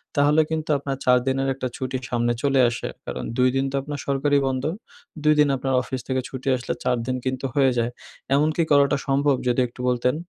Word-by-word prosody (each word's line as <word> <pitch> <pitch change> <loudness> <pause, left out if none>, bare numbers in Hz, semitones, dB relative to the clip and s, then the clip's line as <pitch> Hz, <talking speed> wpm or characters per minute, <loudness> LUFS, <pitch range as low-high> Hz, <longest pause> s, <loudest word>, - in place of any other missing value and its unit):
তাহলে 145 +2 +4
কিন্তু 160 -1 -3
আপনার 135 -1 -4
৪ 125 0 +6
দিনের 135 0 +1
একটা 130 -1 -4
ছুটি 130 0 -3
সামনে 120 0 +1
চলে 135 -1 +3
আসে। 120 - -4 0.2
কারণ - - -5
২ 125 0 +4
দিন 135 0 +1
তো - - -3
আপনার 145 0 -6
সরকারি 140 +1 +2
বন্ধ। 130 -1 -2 0.6
২ 155 0 +5
দিন 150 - +6
আপনার 135 +1 -2
অফিস 130 0 -5
থেকে 130 -1 0
ছুটি 130 0 -8
আসলে 125 - -3
৪ 125 - +1
দিন 130 - 0
কিন্তু 130 0 -2
হয়ে 135 -2 +4
যায়, 120 +1 0 0.4
এমনকি 155 +3 +2
করাটা 140 -1 +4
সম্ভব? 140 +1 +2
যদি 125 +1 +2
একটু 120 - -21
বলতেন। 125 +2 +1
135 Hz, 205 wpm, -23 LUFS, 130-145 Hz, 0.6 s, ৪